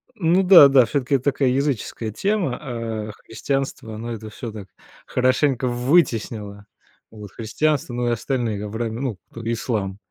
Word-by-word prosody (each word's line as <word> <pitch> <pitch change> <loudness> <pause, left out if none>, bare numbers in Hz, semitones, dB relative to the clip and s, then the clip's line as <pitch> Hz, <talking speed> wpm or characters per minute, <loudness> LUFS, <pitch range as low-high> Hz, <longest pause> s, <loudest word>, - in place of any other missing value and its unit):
Ну 180 -1 +2
да, 180 -6 +9
да, 135 -3 +5
всё-таки 135 +3 0
это 130 - -1
такая 135 -2 +2
языческая 130 -4 -2
тема, 190 - -1
а 115 -5 -4
христианство- 135 -2 -3
оно 115 +2 -6
это 110 -1 -8
всё 115 +2 -7
так 105 -3 -9 0.4
хорошенько 130 0 +1
вытеснило, 115 -6 0 0.4
вот, 105 -3 -11
христианство, 135 +4 -1
ну 120 0 -1
и - - +2
остальные, 115 -3 -2
авраи 110 +2 -3
ну, 115 -3 -3
кто- 115 - -9
ислам, 105 -5 -2
120 Hz, 150 wpm, -22 LUFS, 110-135 Hz, 0.4 s, да